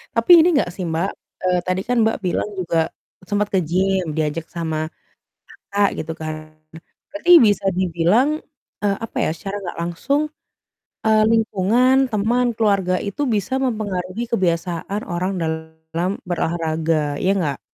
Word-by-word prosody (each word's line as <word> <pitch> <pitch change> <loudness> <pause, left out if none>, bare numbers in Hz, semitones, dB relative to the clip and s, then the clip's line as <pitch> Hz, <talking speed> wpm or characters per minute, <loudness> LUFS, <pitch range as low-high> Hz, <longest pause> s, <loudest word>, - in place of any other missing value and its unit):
Tapi 360 - +3
ini 325 - +4
nggak 175 - -1
sih, 190 - -4
Mbak, 165 +4 -1 0.3
eee, 180 -1 +2
tadi 185 +1 0
kan 245 0 +1
Mbak, 225 - +1
bilang 180 +3 -1
juga 165 -2 0 0.4
sempat 205 0 +1
ke 190 - +4
gym, 185 +1 0
diajak 160 +1 -1
sama 160 -2 -3 0.8
kakak 200 0 +3
gitu 160 +1 -5
kan. 155 0 -7 0.6
Berarti 315 +4 +1
bisa 205 -2 +2
dibilang, 185 - +2 0.4
eee, 200 -1 +2
apa - - -10
ya - - +1
secara 195 +4 -6
nggak 175 - -6
langsung, 175 - 0 0.8
eee, 215 0 +5
lingkungan, 225 +4 +3
teman, 230 +4 +1
keluarga 200 -5 +2
itu 200 +7 -4
bisa 215 +2 -1
mempengaruhi 215 -5 -2
kebiasaan 180 0 -1
orang 175 +2 -1
dalam 160 +2 -3 0.2
berolahraga, 160 -3 -1
ya 190 - +2
nggak? 145 -7 -1
185 Hz, 140 wpm, -21 LUFS, 165-210 Hz, 0.8 s, eee